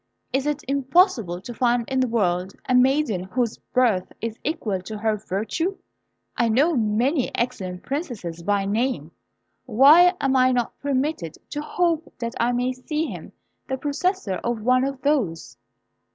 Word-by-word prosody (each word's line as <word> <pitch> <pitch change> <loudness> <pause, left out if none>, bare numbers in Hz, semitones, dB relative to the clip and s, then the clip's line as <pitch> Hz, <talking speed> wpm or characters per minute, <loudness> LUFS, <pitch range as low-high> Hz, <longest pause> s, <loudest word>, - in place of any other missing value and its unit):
Is 270 +2 0
it 295 0 -1
impossible 270 - +2
to 240 - -8
find 240 -1 +1
in 265 -1 0
the 255 - +2
world 190 -5 0
a 255 - +1
maiden 250 -7 +3
whose 235 +3 -2
birth 230 -8 +2
is 230 -1 -5
equal 220 - -2
to 210 +4 -7
her 215 0 0
virtue? 215 - -2 0.6
I 235 - +2
know 290 +9 +3
many 240 +5 +1
excellent 195 -7 -3
princesses 240 - -4
by 200 +2 0
name; 210 - -1 0.6
why 300 - +7
am 270 -1 +1
I 255 0 +4
not 245 -2 -1
permitted 275 - -1 0.2
to 295 - -3
hope 330 0 0
that 235 -1 -4
I 235 +1 +2
may 250 +1 0
see 300 +5 -3
him - - -8 0.3
the 265 - -2
possessor 290 - -1
of 235 -2 -2
one 255 +2 +3
of 275 -1 -4
those?" 170 - 0
250 Hz, 155 wpm, -23 LUFS, 210-280 Hz, 0.6 s, why